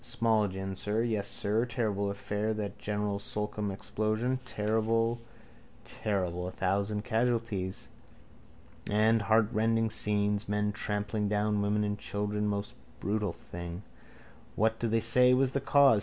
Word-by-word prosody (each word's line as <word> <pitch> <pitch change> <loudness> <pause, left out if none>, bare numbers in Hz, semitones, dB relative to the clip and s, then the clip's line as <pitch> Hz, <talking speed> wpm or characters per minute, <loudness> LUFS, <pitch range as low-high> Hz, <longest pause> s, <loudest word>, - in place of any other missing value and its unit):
A - - -24
small 115 -3 +2
gin, 95 0 -4
sir. 105 +4 -1
Yes, 110 -4 0
sir. 105 +3 0
Terrible 105 -5 -1
affair 105 +2 -2
that 105 -2 -4
General 105 -1 -2
Slocum 105 0 -3
explosion. 110 +5 -1
Terrible, 110 +2 0 0.6
terrible! 90 -4 -2
A - - -4
thousand 100 +3 -1
casualties. 115 -5 -1 1.0
And 110 +2 +3
heartrending 110 +1 +2
scenes. 105 -1 +1
Men 105 0 +1
trampling 105 0 -1
down 105 0 +1
women 105 +1 +1
and 105 -1 -2
children. 105 +1 -2
Most 100 0 -2 0.3
brutal 105 -1 -1
thing. 85 +3 -8 0.7
What 110 +1 +1
do 120 - 0
they 115 0 +2
say 125 +3 +6
was 130 0 +2
the 140 - -1
cause? 140 -4 +5
105 Hz, 135 wpm, -30 LUFS, 100-115 Hz, 1.0 s, say